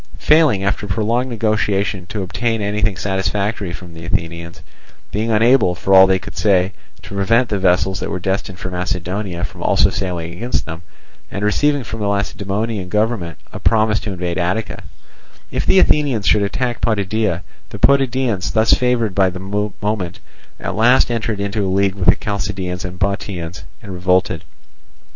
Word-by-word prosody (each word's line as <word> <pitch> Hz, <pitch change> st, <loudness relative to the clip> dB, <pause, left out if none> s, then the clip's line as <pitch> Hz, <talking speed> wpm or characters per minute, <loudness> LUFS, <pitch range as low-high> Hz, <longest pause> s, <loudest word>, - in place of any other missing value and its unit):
Failing 150 Hz, -11 st, +4 dB
after 100 Hz, +1 st, -1 dB
prolonged 115 Hz, +5 st, 0 dB
negotiation 105 Hz, -5 st, 0 dB
to 105 Hz, -1 st, -3 dB
obtain 115 Hz, +5 st, -1 dB
anything 105 Hz, -2 st, -1 dB
satisfactory 100 Hz, +1 st, -1 dB
from 85 Hz, -1 st, -9 dB
the 80 Hz, 0 st, -10 dB
Athenians; 85 Hz, 0 st, -4 dB, 0.5 s
being 110 Hz, +3 st, -1 dB
unable, 110 Hz, -3 st, +4 dB
for 95 Hz, +2 st, 0 dB
all 95 Hz, 0 st, +9 dB
they 95 Hz, 0 st, +3 dB
could 95 Hz, -, -10 dB
say, 95 Hz, -2 st, +2 dB, 0.3 s
to -, -, -9 dB
prevent 115 Hz, +5 st, +2 dB
the 105 Hz, -2 st, -1 dB
vessels 95 Hz, +1 st, +2 dB
that -, -, -3 dB
were -, -, -2 dB
destined 95 Hz, +1 st, -2 dB
for 90 Hz, -, -5 dB
Macedonia 90 Hz, +1 st, -3 dB
from -, -, -9 dB
also -, -, +3 dB
sailing 85 Hz, -3 st, -3 dB
against 120 Hz, +8 st, -2 dB
them; 80 Hz, +1 st, -7 dB, 0.5 s
and 100 Hz, -, -3 dB
receiving 145 Hz, +6 st, +2 dB
from 115 Hz, 0 st, -6 dB
the 105 Hz, -, -1 dB
Lacedaemonian 100 Hz, 0 st, -2 dB
government 105 Hz, -5 st, -1 dB, 0.2 s
a -, -, -6 dB
promise 110 Hz, -1 st, +2 dB
to 105 Hz, -, -5 dB
invade 90 Hz, -2 st, -3 dB
Attica, 95 Hz, +5 st, -2 dB, 0.7 s
if -, -, -2 dB
the -, -, +5 dB
Athenians 140 Hz, -, +3 dB
should 105 Hz, -, +4 dB
attack 120 Hz, +4 st, -2 dB
Potidæa, 105 Hz, -3 st, 0 dB, 0.3 s
the -, -, -7 dB
Potidæans, 130 Hz, -7 st, +2 dB
thus 110 Hz, +1 st, +4 dB
favoured 125 Hz, -5 st, +1 dB
by 95 Hz, -1 st, +3 dB
the 90 Hz, 0 st, -7 dB, 0.4 s
moment, 100 Hz, -4 st, -2 dB, 0.4 s
at -, -, -4 dB
last 120 Hz, +3 st, +4 dB
entered 115 Hz, -3 st, -2 dB
into 100 Hz, 0 st, -1 dB
league 95 Hz, 0 st, +2 dB
with 95 Hz, -2 st, +2 dB
the -, -, +6 dB
Chalcidians 90 Hz, -3 st, -3 dB
and 90 Hz, -1 st, -6 dB
Bottiaeans, 95 Hz, -2 st, -3 dB, 0.2 s
and 100 Hz, -3 st, -7 dB
revolted. 90 Hz, -2 st, +1 dB
100 Hz, 160 wpm, -19 LUFS, 90-110 Hz, 0.7 s, all